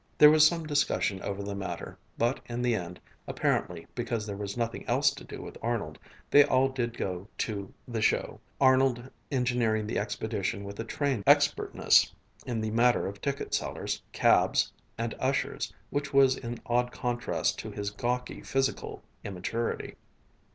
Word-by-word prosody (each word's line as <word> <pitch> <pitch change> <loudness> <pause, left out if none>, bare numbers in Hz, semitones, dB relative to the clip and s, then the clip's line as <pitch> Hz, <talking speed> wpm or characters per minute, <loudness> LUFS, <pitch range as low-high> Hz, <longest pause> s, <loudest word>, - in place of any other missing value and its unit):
There 150 0 +9
was 155 0 +7
some 165 -1 -2
discussion 140 -9 +1
over 100 0 -4
the 100 0 -4
matter, 100 -1 -5 0.2
but 120 +3 +1
in 120 +1 -3
the 120 -1 +2
end, 90 -4 -4 0.3
apparently - - -1
because 115 -3 -2
there 100 -2 -4
was 100 +2 -5
nothing 115 -1 -2
else - - +3
to - - -10
do - - -8
with - - -9
Arnold, 115 -2 -2 0.3
they 145 - +9
all 135 -1 +3
did 120 -3 -3
go 90 +1 -3
to 100 -3 -3 0.2
the 115 -3 -3
"show," - - +1 0.2
Arnold 130 -2 +3 0.2
engineering 120 -4 +1
the 105 - -1
expedition 105 -1 -2
with 100 0 -8
a - - -1
trained 135 -4 -1
expertness - - +4 0.4
in 115 -3 -1
the 110 0 -2
matter 120 +2 +3
of 100 +1 -6
ticket 140 0 -3
sellers, - - -2
cabs, - - +3 0.2
and 115 0 -2
ushers 135 +1 -1 0.2
which 145 0 -2
was 135 -1 +5
in 120 0 -5
odd 125 +1 +1
contrast 120 0 -1
to - - -5
his 100 0 -4
gawky 120 +4 -2
physical 135 0 -2 0.2
immaturity. 100 +5 -3
120 Hz, 160 wpm, -29 LUFS, 105-130 Hz, 0.4 s, There